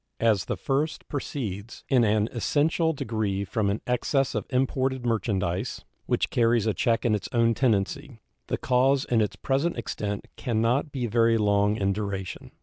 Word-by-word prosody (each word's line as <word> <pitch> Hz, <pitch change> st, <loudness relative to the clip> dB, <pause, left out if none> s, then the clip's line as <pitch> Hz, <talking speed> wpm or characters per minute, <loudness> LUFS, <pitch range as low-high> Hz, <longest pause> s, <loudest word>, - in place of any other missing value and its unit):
As 110 Hz, -5 st, +2 dB
the -, -, -3 dB
first 145 Hz, +4 st, -1 dB
proceeds 120 Hz, -7 st, -5 dB
in 130 Hz, -3 st, +4 dB
an 105 Hz, -1 st, +2 dB
essential 155 Hz, +7 st, +1 dB
degree 110 Hz, -8 st, -2 dB
from 100 Hz, +1 st, 0 dB
an 100 Hz, -, -1 dB
excess 130 Hz, +2 st, +1 dB
of -, -, -3 dB
imported 130 Hz, -1 st, 0 dB
merchandise, 100 Hz, -6 st, -1 dB, 0.2 s
which -, -, 0 dB
carries 115 Hz, -2 st, +3 dB
a 110 Hz, -, +1 dB
check 115 Hz, +3 st, +1 dB
in 115 Hz, -, +3 dB
its 105 Hz, -, -2 dB
own 115 Hz, -1 st, +3 dB
tendency, 115 Hz, 0 st, 0 dB, 0.3 s
the -, -, -1 dB
cause 130 Hz, +2 st, +2 dB
in 115 Hz, -2 st, +2 dB
its 105 Hz, -, -1 dB
present 140 Hz, +5 st, 0 dB
extent 105 Hz, -3 st, -4 dB
can 115 Hz, -3 st, -1 dB
not 125 Hz, +7 st, +1 dB
be 130 Hz, -3 st, -2 dB
very 115 Hz, 0 st, +3 dB
long 105 Hz, -1 st, +2 dB
in 100 Hz, -2 st, +1 dB
duration. 100 Hz, -2 st, -5 dB
115 Hz, 165 wpm, -26 LUFS, 105-130 Hz, 0.3 s, in